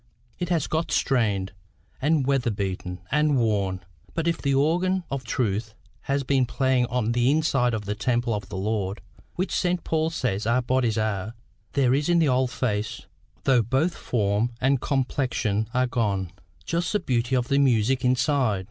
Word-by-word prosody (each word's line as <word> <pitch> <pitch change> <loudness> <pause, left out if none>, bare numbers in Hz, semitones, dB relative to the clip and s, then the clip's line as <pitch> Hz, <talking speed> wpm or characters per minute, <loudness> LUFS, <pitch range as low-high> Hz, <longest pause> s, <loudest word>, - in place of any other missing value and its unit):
It 175 - -2
has 170 -4 +1
got 160 +1 -1
stained, 105 -8 +1 0.5
and 150 -1 +2
weather 135 -3 +1
beaten, 95 -3 -4
and 150 -1 +3
worn; 100 -5 0 0.3
but 165 0 -1
if 170 - 0
the 140 -1 +1
organ 175 +6 +2
of 135 -1 -3
truth 110 -2 -2 0.3
has 140 0 +1
been 130 -1 +2
playing 130 -1 +1
on 120 -2 0
inside 130 0 +2
the 105 -2 -2
temple 120 +1 0
of 100 -2 -4
the 100 - -5
Lord, 100 0 -2 0.4
which 185 +2 -2
St. 180 -1 0
Paul 160 0 0
says 110 - -2
our 125 +2 +2
bodies 120 -3 +1
are, 110 0 -2 0.4
there 130 -3 +3
is 145 +4 +1
in 175 - +4
the 160 -4 +3
old 130 0 +2
face, 110 -4 -2 0.4
though 130 -3 +4
both 135 - +1
form 105 0 0
and 135 0 +2
complexion 125 -6 -1
are 125 +2 +2
gone, 100 -7 -1 0.3
just 170 +1 -1
the 210 - +2
beauty 125 -6 0
of 125 -1 0
the 140 - +3
music 130 -1 +2
inside. 125 -4 +2
125 Hz, 165 wpm, -25 LUFS, 110-140 Hz, 0.5 s, in